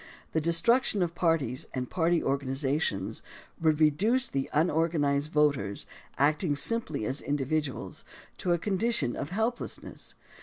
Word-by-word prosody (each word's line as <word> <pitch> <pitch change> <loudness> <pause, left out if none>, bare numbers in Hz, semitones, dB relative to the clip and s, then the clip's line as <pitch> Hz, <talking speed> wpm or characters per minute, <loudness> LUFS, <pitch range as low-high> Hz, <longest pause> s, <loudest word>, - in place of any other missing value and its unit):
The 160 - 0
destruction 200 - +3
of 170 -1 -2
parties 165 -6 0
and 125 -1 -2
party 170 +2 +1
organizations 135 -4 -1 0.4
would 155 -2 +3
reduce 205 - +3
the 135 -1 -2
un 160 +4 +2
organized 150 -2 +1
voters, 140 -11 +1 0.3
acting 150 +2 +2
simply 155 - -1
as 135 +5 -2
individuals, 145 0 -2 0.4
to 180 - 0
a 175 - +4
condition 195 - 0
of 145 - -4
helplessness. 225 +5 -4
155 Hz, 125 wpm, -29 LUFS, 140-175 Hz, 0.4 s, a